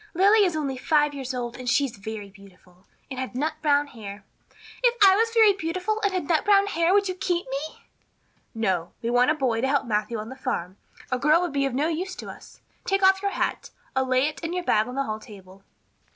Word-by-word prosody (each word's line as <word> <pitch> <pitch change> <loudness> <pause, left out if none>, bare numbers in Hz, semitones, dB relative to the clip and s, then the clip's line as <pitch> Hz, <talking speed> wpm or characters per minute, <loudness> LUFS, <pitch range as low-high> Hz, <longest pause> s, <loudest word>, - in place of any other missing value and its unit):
Lily 405 +4 +5
is 360 -4 +1
only 275 -4 -2
five 295 +1 +2
years 270 -2 -5
old 245 -1 -5
and 250 -1 -3
she 280 +4 +3
is 255 - -7
very 205 -1 -7
beautiful 190 -2 -20 0.2
and 260 - -5
had 260 -1 -5
nut 305 +4 -1
brown 290 -2 +3
hair. 210 -6 -10 0.6
If 485 -1 +4
I 380 - +6
was 455 +3 +2
very 445 -3 +6
beautiful 370 +4 -2
and 405 - +1
had 370 -1 -3
nut 330 -3 +2
brown 400 -1 +4
hair 335 -3 +1
would 400 0 +3
you 370 - -2
keep 355 -1 -2
me?" 280 +4 -5 0.7
"No. 185 -6 -1
We 230 - -1
want 245 +2 +4
a 305 - +3
boy 250 -6 0
to 265 - +1
help 275 0 +1
Matthew 215 0 -1
on 215 +1 -6
the 260 - -8
farm. 200 -9 -4 0.3
A 255 - 0
girl 300 +5 +4
would 350 -5 -2
be 275 -1 +1
of 260 - -4
no 290 +4 +1
use 355 +3 -3
to - - -8
us. - - -15 0.2
Take 390 0 0
off 385 0 +5
your 400 - 0
hat. - - -2 0.3
I'll 265 0 +1
lay 255 +1 +3
it 305 - -6
and 330 +2 -3
your 360 - -2
bag 215 -9 +2
on 250 - -7
the 275 - 0
hall 215 -4 -4
table." 195 -2 -14
275 Hz, 240 wpm, -25 LUFS, 230-360 Hz, 0.7 s, I